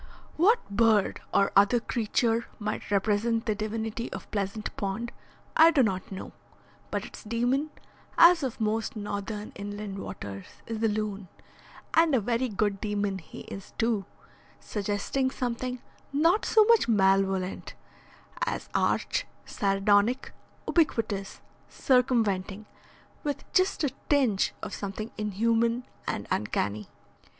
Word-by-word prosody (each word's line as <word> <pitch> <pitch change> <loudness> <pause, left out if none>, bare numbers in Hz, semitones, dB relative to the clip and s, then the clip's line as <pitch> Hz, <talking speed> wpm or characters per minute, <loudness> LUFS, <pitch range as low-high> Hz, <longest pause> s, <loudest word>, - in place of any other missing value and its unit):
What 420 +9 +3
bird 215 -2 +3
or 195 - +3
other 205 +5 +5
creature 230 0 0
might 210 - -4
represent 215 +3 +1
the 220 - +1
divinity 220 +2 -3
of - - -8
Pleasant 205 +1 -3
Pond 200 +4 -3 0.4
I 320 +1 +8
do 290 -6 +4
not 190 -4 -2
know, 190 - -6 0.6
but - - -2
its - - -11
demon, 245 +7 0 0.5
as 340 0 +8
of 260 -4 -3
most 220 +1 -1
northern 205 0 -4
inland 205 0 -6
waters, 100 - -7 0.2
is 225 -1 -4
the 225 - +2
loon, 210 -2 -2 0.7
and 325 -3 +5
a - - +4
very 240 +4 0
good 205 -1 -1
demon 205 -2 -1
he 160 - -11
is 195 0 -9
too, 225 -4 +1 0.5
suggesting 210 +6 -1
something 250 -1 -3 0.3
not 330 +8 +3
so 440 - +6
much 465 - +5
malevolent, 195 -3 +1 0.7
as - - -3
arch, - - +1 0.2
sardonic, 205 +5 +2 0.3
ubiquitous, 225 - 0 0.3
circumventing, 220 -6 +1 0.6
with 290 -2 -2
just 370 -3 +2
a 285 - +1 0.2
tinge 255 -9 +2
of - - -5
something 210 +3 -5
inhuman 230 +3 +1 0.2
and 100 - -2
uncanny. 105 0 -1
215 Hz, 125 wpm, -28 LUFS, 200-245 Hz, 0.7 s, I